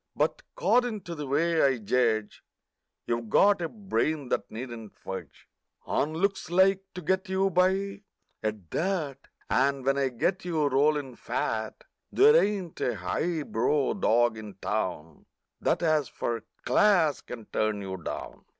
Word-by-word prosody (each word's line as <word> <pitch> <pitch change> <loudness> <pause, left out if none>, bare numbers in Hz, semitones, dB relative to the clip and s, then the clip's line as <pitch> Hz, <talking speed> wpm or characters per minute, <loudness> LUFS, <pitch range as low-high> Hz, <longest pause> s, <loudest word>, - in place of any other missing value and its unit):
But - - 0
'cordin' 245 -4 +2
to 170 -1 -7
the 150 -3 -5
way 160 +4 +2
I 135 -2 +3
judge 110 -1 0 0.6
You've 115 -1 -2
got 200 - +5
a 165 - -2
brain 160 - -1
that - - -1
needn't 115 -2 -8
fudge - - -8 0.4
On 155 +2 0
looks 195 +3 0
to 190 +3 +5 0.3
get 190 +3 0
you 190 +1 +1
by, 190 +2 +1 0.4
at 105 -6 -4
that, 165 -7 -1 0.3
And 135 +2 +1
when 135 +1 +2
I 135 -1 +2
get 150 +10 -1
you 165 -4 0
rollin' 140 -1 +1
fat 110 -1 -3 0.3
There 440 +3 +6
ain't 200 - +1
a 120 - 0
high 155 - -2
brow 135 +4 +1
dog 120 - +2
in 105 -3 -9
town 80 -4 -4 0.3
That 170 +1 0
as 155 -4 +2
for 115 -2 -3 0.2
"class" 160 +1 +4
can 115 -3 -9
turn 110 -1 -1
you 95 -1 -5
down! 85 - -7
145 Hz, 145 wpm, -28 LUFS, 115-185 Hz, 0.6 s, There